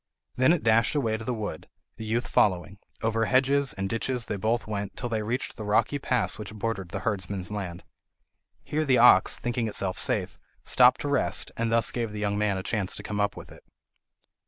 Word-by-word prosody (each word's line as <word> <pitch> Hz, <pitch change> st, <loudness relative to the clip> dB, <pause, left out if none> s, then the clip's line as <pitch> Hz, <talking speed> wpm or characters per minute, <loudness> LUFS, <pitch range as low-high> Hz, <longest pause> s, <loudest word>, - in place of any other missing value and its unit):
Then 130 Hz, +4 st, +4 dB
it 175 Hz, -, +1 dB
dashed 115 Hz, +3 st, +3 dB
away 115 Hz, -7 st, +1 dB
to 110 Hz, -, -8 dB
the 125 Hz, -, -2 dB
wood, 110 Hz, -9 st, -5 dB, 0.3 s
the 110 Hz, -, -7 dB
youth 115 Hz, +3 st, -1 dB
following; 95 Hz, 0 st, +1 dB, 0.2 s
over 115 Hz, 0 st, +1 dB
hedges 135 Hz, +3 st, +2 dB
and 95 Hz, 0 st, -3 dB
ditches 115 Hz, +3 st, -1 dB
they 105 Hz, -, -3 dB
both 110 Hz, +4 st, -1 dB
went, 100 Hz, -2 st, -5 dB
till 120 Hz, -, -3 dB
they 110 Hz, -2 st, -1 dB
reached 115 Hz, +5 st, -3 dB
the 110 Hz, -, -6 dB
rocky 105 Hz, +7 st, +1 dB
pass 115 Hz, -8 st, 0 dB
which 105 Hz, 0 st, -7 dB
bordered 105 Hz, -4 st, -3 dB
the 95 Hz, +1 st, -5 dB
herdsman's 95 Hz, -2 st, -3 dB
land. 95 Hz, -4 st, -5 dB, 0.8 s
Here 155 Hz, +1 st, -1 dB
the 130 Hz, -4 st, +3 dB
ox, 115 Hz, -6 st, +6 dB
thinking 120 Hz, -1 st, -2 dB
itself 95 Hz, -3 st, -2 dB
safe, -, -, -1 dB, 0.2 s
stopped 125 Hz, 0 st, +5 dB
to -, -, -3 dB
rest, 140 Hz, -2 st, 0 dB
and 115 Hz, 0 st, -1 dB
thus 115 Hz, 0 st, +2 dB
gave 115 Hz, -3 st, -3 dB
the 105 Hz, -, -5 dB
young 100 Hz, -1 st, -1 dB
man 105 Hz, -2 st, 0 dB
a 95 Hz, -, -4 dB
chance 100 Hz, -4 st, -1 dB
to -, -, -8 dB
come 105 Hz, -1 st, -4 dB
up 100 Hz, 0 st, 0 dB
with -, -, -10 dB
it. -, -, -15 dB
110 Hz, 205 wpm, -27 LUFS, 100-120 Hz, 0.8 s, ox